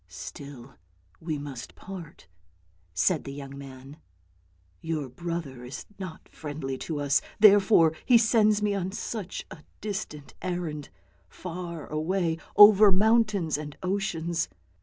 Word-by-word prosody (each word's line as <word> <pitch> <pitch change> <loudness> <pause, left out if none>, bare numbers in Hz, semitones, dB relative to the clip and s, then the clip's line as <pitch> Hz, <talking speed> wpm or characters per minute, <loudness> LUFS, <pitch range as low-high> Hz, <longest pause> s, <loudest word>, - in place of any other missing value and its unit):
" - - -39 0.2
Still, 135 -3 -11 0.4
we 160 -2 -3
must 140 -4 -8
part," 180 -5 -10 0.6
said 140 - +1
the 140 - -7
young 140 -1 -8
man: 135 +1 -11 0.4
" 90 0 -37
your 150 -4 -1
brother 160 -3 -5
is 125 +2 -7
not 185 -4 -8
friendly 145 -3 -5
to 155 -3 -4
us, 145 0 +2 0.2
therefore 200 -5 +6
he 245 - +6
sends 215 -2 +3
me 205 -1 +2
on 190 -1 -2
such 205 -4 -5
a - - -9 0.2
distant 195 -8 -5
errand, 170 -5 -4 0.4
far 170 -3 -6
away 165 +1 -1 0.2
over 205 0 +9
mountains 205 -5 +3
and 150 -1 -7
oceans. 175 -4 -1
165 Hz, 130 wpm, -27 LUFS, 140-195 Hz, 0.6 s, over